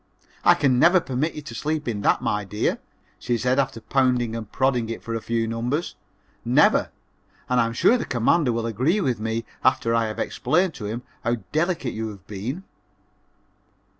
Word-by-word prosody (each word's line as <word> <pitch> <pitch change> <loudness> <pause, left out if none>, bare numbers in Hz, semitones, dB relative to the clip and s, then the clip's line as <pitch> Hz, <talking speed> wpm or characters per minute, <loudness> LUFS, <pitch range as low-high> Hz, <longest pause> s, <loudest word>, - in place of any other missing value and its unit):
"I - - +6
can 130 -4 +2
never 175 +5 +6
permit 150 +1 -2
you 150 - -7
to 145 - -8
sleep 150 -1 -2
in 105 -4 -2
that, - - +2
my 105 0 0
dear," 105 +2 -1 0.4
she 120 -1 -1
said 125 +3 +1
after 130 -4 -1
pounding 125 -2 +1
and 110 -3 -6
prodding 125 -4 +1
it 115 - -5
for 115 - -4
a 115 - -2
few 115 0 -1
numbers; 120 +9 -2 0.5
"never - - +4 0.6
and 125 0 +2
I 115 - +2
am 115 - -4
sure 240 - +4
the - - -3
Commander 125 +4 +2
will 115 0 -2
agree 130 - +1
with 130 - 0
me 110 +1 -2 0.2
after 115 -3 +2
I 115 -1 +2
have 110 - -5
explained 170 +7 0
to 105 - -7
him 115 +4 -4 0.2
how 120 +1 +1 0.2
delicate 160 -5 0
you 110 0 -3
have 100 -3 -10
always 100 -2 -7
been." 140 - -4
120 Hz, 195 wpm, -24 LUFS, 115-145 Hz, 0.6 s, I